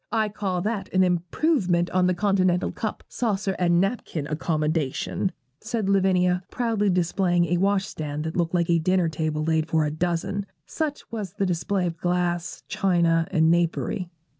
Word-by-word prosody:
I 220 -2 +1
call 195 -3 -2
that 210 -2 -3
an 185 - +5
improvement 180 - +1
on 180 0 +3
the 180 - +1
continental 185 -2 +2
cup, 215 -2 -4
saucer, 200 -5 -1
and 175 -1 +3
napkin 195 -6 -1
accommodation,' 155 +2 -1 0.3
said 220 -2 -2
Lavinia, 185 -2 +3
proudly 225 -4 0
displaying 175 0 +2
a 175 +1 +1
wash 195 +1 +2
stand 150 -1 -5
that 160 0 -4
looked 170 0 0
like 170 -1 +1
a 170 - +4
dinner 180 0 +2
table 155 -1 -2
laid 160 0 +1
for 160 -1 +2
a 150 - -1
dozen, 175 +5 -2 0.2
such 305 -3 -3
was 210 -6 -5
the 205 -2 -1
display 180 +2 0
of 170 -1 -3
glass, 175 0 -1
china, 170 -3 +2
and 160 0 +3
napery. 175 +1 0
180 Hz, 165 wpm, -25 LUFS, 165-195 Hz, 0.3 s, an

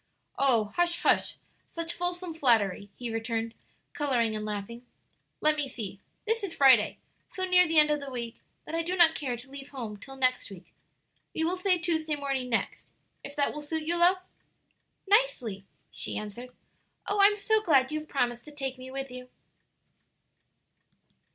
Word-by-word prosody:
"Oh, 230 -7 +2
hush, 345 -1 +2
hush! - - +2 0.3
such 335 0 -3
fulsome 355 -1 -3
flattery," 220 - +2
he 240 -2 -5
returned, 225 0 -2 0.4
coloring 245 -7 0
and 215 - -4
laughing. 215 +3 -5 0.6
"Let 305 0 +5
me 295 -2 -2
see; 210 -6 -6 0.3
this 450 0 0
is 380 -4 -3
Friday, 260 -6 +5 0.3
so 375 - -3
near 360 -1 +6
the 325 0 0
end 300 0 +7
of 295 - +1
the 280 -1 -7
week 235 -3 -5 0.3
that 305 - -9
I 330 - +1
do 350 +3 -2
not 340 -3 +6
care 255 -6 -3
to 260 +3 -13
leave 275 0 -9
home 230 -6 -6
till 270 +6 -11
next 255 -3 +1
week. 190 -3 -13 0.6
We 320 - 0
will 345 +3 +1
say 370 0 +2
Tuesday 320 -2 -1
morning 275 -3 -3
next, 230 - -2 0.4
if 285 - -8
that 285 -2 +1
will 300 - -6
suit 315 +2 -3
you, 335 +3 0
love?" 350 +2 +4 0.9
"Nicely," 380 - +1 0.3
she - - -3
answered. 215 +4 -7 0.6
"Oh, 405 0 +1
I'm 410 +1 +7
so 435 +2 +2
glad 275 -9 +3
you 310 - -1
have 310 - -12
promised 240 -3 -1
to 300 - -11
take 270 -3 -5
me 255 0 -9
with 270 0 -5
you!" 250 0 -9
275 Hz, 175 wpm, -28 LUFS, 240-335 Hz, 0.9 s, end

